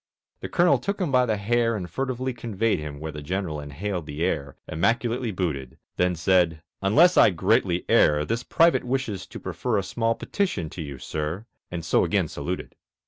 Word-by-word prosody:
The - - -6
Colonel 175 0 +4
took 200 +1 -3
him 175 -7 -1
by 125 -1 +4
the 110 - +1
hair 115 +3 +1
And 95 -4 -4
furtively 130 +2 -2
conveyed 115 -3 -1
him 75 -2 -6
where 80 +1 -5
The 75 0 -7
General 85 0 -3
inhaled 80 +4 -4
the 75 +2 -3
air, 70 -6 -1
Immaculately 115 +8 0
booted; 80 -10 -3 0.2
Then 90 0 +2
said, 85 -2 +2 0.2
"Unless 155 - +5
I - - +8
greatly 85 -1 +1
err 75 0 +4
This 115 +1 -1
Private 165 +5 +3
wishes 125 -6 -2
to - - -9
prefer 120 -4 -2
A 100 - 0
small 115 +4 0
petition 100 - -2
to 90 - -6
you, 70 -3 -6
Sir," 75 - -4 0.2
And 85 -2 -5
so - - +3
again - - +1
saluted. - - -5
95 Hz, 185 wpm, -25 LUFS, 80-120 Hz, 0.2 s, I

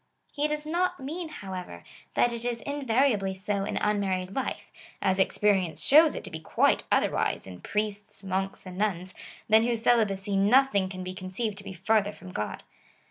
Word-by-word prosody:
He 295 0 0
does 300 0 -2
not 345 +1 0
mean, 320 +5 -5
however, 185 - -7 0.3
that 240 - +3
it 235 0 -5
is 240 -1 -2
invariably 255 -8 +1
so 195 +1 -2
in - - -3
un 210 0 +1
married 185 -1 -2
life, 265 - -3 0.3
as 190 0 +1
experience 190 -5 +1
shows 310 +2 +7
it - - -5
to - - -7
be 160 - -5
quite 160 - +2
otherwise - - +1
in 90 -2 -10
priests, 205 -1 -3
monks, 190 0 -3
and 185 0 -8
nuns, 185 -3 -1 0.3
than 220 +1 +6
whose 230 -1 0
celibacy 205 -4 +2
nothing 200 -1 +4
can 185 -1 -6
be 185 0 -5
conceived 195 +3 -4
to - - -11
be 195 - -7
farther 205 +3 +1
from 185 0 -11
God. 105 -10 -4
205 Hz, 180 wpm, -28 LUFS, 190-240 Hz, 0.3 s, shows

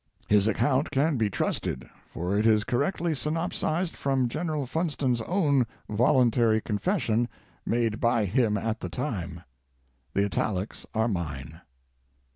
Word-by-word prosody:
His 105 0 +4
account 130 +6 +2
can 145 +2 +1
be 110 -3 +1
trusted, - - -2 0.2
for 90 +4 -2
it 105 +2 +3
is 110 -1 +4
correctly 160 - 0
synop 160 +4 -1
sized 170 +2 -1
from 135 -3 +1
General 155 0 -2
Funston's 135 -4 0
own 140 - +2 0.2
voluntary 115 0 +3
confession 120 - 0 0.4
made 115 -2 +1
by 115 -2 +2
him 105 +1 +2
at 110 +2 -2
the - - -5
time. 90 - -4 0.7
The 100 - +3
italics 100 +1 -2
are 110 +1 +2
mine. 75 - -4
120 Hz, 130 wpm, -27 LUFS, 105-145 Hz, 0.7 s, His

